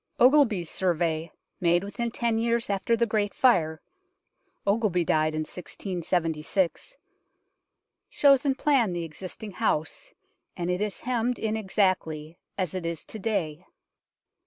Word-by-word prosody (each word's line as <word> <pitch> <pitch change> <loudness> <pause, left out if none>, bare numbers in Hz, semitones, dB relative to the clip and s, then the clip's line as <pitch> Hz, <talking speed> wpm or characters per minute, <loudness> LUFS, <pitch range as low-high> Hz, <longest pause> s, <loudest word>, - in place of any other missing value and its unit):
Ogilby's 245 - +5
Survey, 165 -2 0 0.3
made 175 0 +3
within 235 +4 -3
ten 230 -1 0
years 230 -1 0
after 200 +4 +1
the 235 - +3
Great 215 -2 -1
Fire 160 -11 +3 0.8
Ogilby 200 -4 +2
died 155 0 +2
in 155 - -1
1676 175 - -2 1.1
shows 275 -2 +5
in 275 -2 +1
plan 260 -10 +2
the 175 -1 -2
existing 185 +6 -8
house, 220 - -2 0.5
and 175 0 -1
it 180 +2 -1
is 210 -2 -3
hemmed 245 0 0
in 220 0 -1
exactly 185 -6 -1 0.2
as 185 -5 -1
it 185 -2 -3
is 165 -2 -4
to 220 - -8
day. 180 -7 -2
190 Hz, 130 wpm, -27 LUFS, 170-230 Hz, 1.1 s, Ogilby's